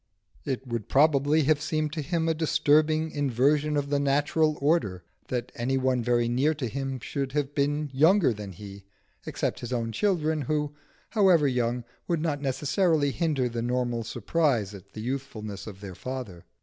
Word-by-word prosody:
It 130 -1 -3
would 115 -4 -4
probably 145 +1 +4
have 150 +1 +2
seemed 155 -1 -1
to 155 - -2
him 165 +2 -1
a 165 - +3
disturbing 155 0 +2
inversion 145 +2 +1
of 140 0 -2
the 145 - +2
natural 145 +2 +2
order 140 - +1 0.2
that 125 0 -3
any 130 +3 -1
one 130 -1 +1
very 120 0 +2
near 135 +6 +2
to 135 -4 -3
him 135 +2 -4
should 135 +2 -4
have 145 -1 -1
been 145 +1 0
younger 160 - +4
than 105 -2 -8
he, 100 +1 -10 0.4
except - - -2
his 120 - -6
own 115 -2 -1
children 160 - +1
who, 150 +2 -1 0.4
however 185 -9 +4
young, 125 -1 0 0.2
would 170 -2 +1
not 150 -3 -1
necessarily 145 +3 +1
hinder 145 -5 0
the 115 -1 -3
normal 120 -1 -1
surprise 115 - 0
at 100 0 -13
the 110 - -6
youthfulness 110 -6 -5
of 100 -2 -9
their 100 -2 -7
father. 120 -6 -7
140 Hz, 170 wpm, -27 LUFS, 120-155 Hz, 0.4 s, probably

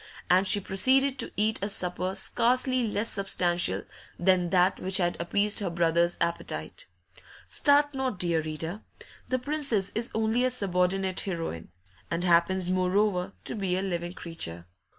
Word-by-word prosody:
And 185 +2 +4
she 205 - +4
proceeded 260 +8 +3
to - - -4
eat 215 +2 +2
a 200 - -2
supper 185 -1 -1
scarcely 250 +4 +1
less 210 +1 -1
substantial 180 -4 0 0.3
than 180 -1 +2
that 180 +1 +2
which 190 0 +2
had 175 -2 +1
appeased 205 +4 +1
her 200 -4 -2
brother's 170 0 +1
appetite. 330 - -4 0.6
Start 290 0 +3
not, 265 -6 -2
dear 170 -2 0
reader; 160 +6 -5 0.5
the 255 - +1
Princess 255 -7 0
is 230 +2 -1
only 220 +2 +1
a 255 - +3
subordinate 190 -4 0
heroine, 165 - -4 0.4
and 170 +1 -2
happens, 175 +1 +2
moreover, 185 0 0
to - - -2
be 190 -4 -1
a 190 - -1
living 175 -2 -3
creature. 85 - -5
190 Hz, 150 wpm, -27 LUFS, 175-220 Hz, 0.6 s, And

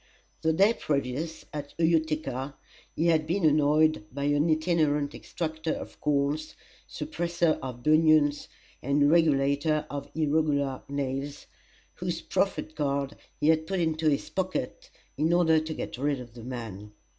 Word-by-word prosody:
The 160 - +2
day 195 +7 +4
previous, 145 - -3
at 145 -1 -6
Utica, 155 -5 0 0.4
he 165 - 0
had 155 -2 +2
been 175 +1 +1
annoyed 155 -2 +3
by 140 +2 -4
an 145 +3 +2
itinerant 155 -3 +1
extractor 160 -1 -4
of - - -8
corns, 150 +1 0 0.3
suppressor 170 +1 -1
of 125 -2 -7
bunions, 155 -1 +4 0.3
and 145 +2 +3
regulator 150 -1 +2
of 140 -1 -5
irregular 145 -3 +1
nails, 140 +1 -3 0.5
whose - - -3
proffered 155 - -1
card 140 -1 -1 0.2
he 150 - +3
had 160 0 +3
put 190 -1 -1
into 160 -1 +1
his 140 - 0
pocket 190 - -3 0.3
in 155 +2 +2
order 160 -2 +4
to 155 +1 -5
get 140 - -5
rid 140 0 0
of 120 -2 -10
the 120 -1 -10
man. 110 -5 -7
150 Hz, 140 wpm, -28 LUFS, 140-160 Hz, 0.5 s, day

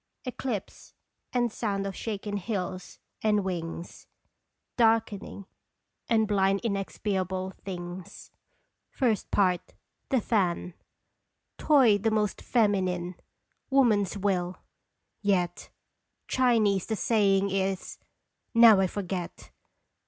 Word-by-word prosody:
" - - -33
Eclipse, 250 -5 -5 0.4
and 240 -2 +1
sound 200 -3 -2
of 195 -1 -4
shaken 205 -2 -4
hills 185 -3 -4 0.2
and 210 -2 +2
wings 170 -2 -5 0.7
Darkening, 225 -4 +1 0.6
and 220 -2 +3
blind 195 -1 +2
inexpiable 190 -3 -2
things." 175 -1 -8 0.7
I. 205 -6 +2 0.5
THE 265 - +3
FAN. 180 -5 0 0.9
Toy 255 -9 +5
the 225 +3 +1
most 210 -2 0
feminine! 185 -6 +1 0.6
Woman's 215 -8 +3
will! 185 -2 -1 0.6
Yet 180 -4 0 0.6
Chinese 220 -7 +2
the 220 - -1
saying 200 -3 +2
is 195 -1 -2 0.6
now 230 -3 +8
I 190 - +3
forget! 185 -2 -5
200 Hz, 95 wpm, -28 LUFS, 185-220 Hz, 0.9 s, now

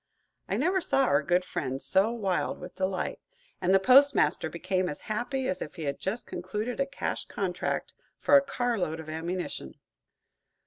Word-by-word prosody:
I - - 0
never 375 +1 +2
saw 270 -4 +2
our 140 - +3
good 175 +4 +1
friend 135 -6 -3
so 190 +8 +3
wild 200 -6 -1
with 180 - -9
delight, 185 -1 -2 0.4
and 180 0 +2
the 195 - +7
postmaster 270 +7 +5
became 185 -1 -1
as 145 - -6
happy 245 +4 -2
as 185 - -2
if - - -6
he 165 - -6
had 140 -1 -2
just 210 +6 -2
concluded 220 +4 -4
a 275 - +1
cash 280 - -3
contract - - -2 0.2
for 285 - +4
a 280 - +9
car 245 -4 -1
load 160 -3 -2
of 160 -1 -8
ammunition. 160 - -4
190 Hz, 175 wpm, -28 LUFS, 175-250 Hz, 0.4 s, a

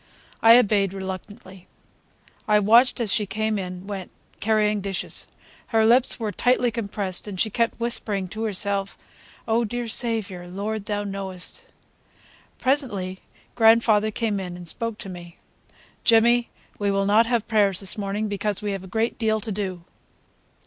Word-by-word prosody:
I 230 +1 +8
obeyed 200 -4 +2
reluctantly. 190 0 -8 0.8
I 210 -1 +5
watched 230 +5 +5
her 240 - 0
as 205 -4 +2
she 210 0 +1
came 215 +1 -1
and 180 0 -6
went, 195 -3 -5 0.3
carrying 210 -1 +2
dishes. 195 -1 -3 0.4
Her 220 -1 +3
lips 245 +3 +4
were 220 -2 -2
tightly 245 +1 +2
compressed 200 -4 -3
and 195 -3 -6
she 220 - +1
kept 230 +1 0
whispering 210 -5 0
to 215 +4 -6
herself: 200 -1 -2 0.5
"Oh, 230 +1 +2
dear 240 +2 -3
Saviour!" 220 -6 -2
"Lord, 200 +3 -4
Thou 205 -1 -1
knowest!" 195 - -5 0.9
Presently 210 -10 -1 0.3
grandfather 225 -2 +4
came 215 -2 -1
in 180 -2 -6
and 175 -1 -10
spoke 230 +6 -3
to 200 - -8
me: 175 -2 -10 0.7
"Jimmy, 235 +1 +4 0.3
we 205 -1 +1
will 195 0 +1
not 215 +3 +4
have 235 -2 0
prayers 205 -4 +2
this 195 - -1
morning, 205 +1 -2
because 205 0 -2
we 205 - -1
have 195 -1 -4
a - - -10
great 225 +4 -1
deal 220 -1 +1
to 215 +1 -5
do. 190 -4 -4
210 Hz, 155 wpm, -24 LUFS, 195-225 Hz, 0.9 s, I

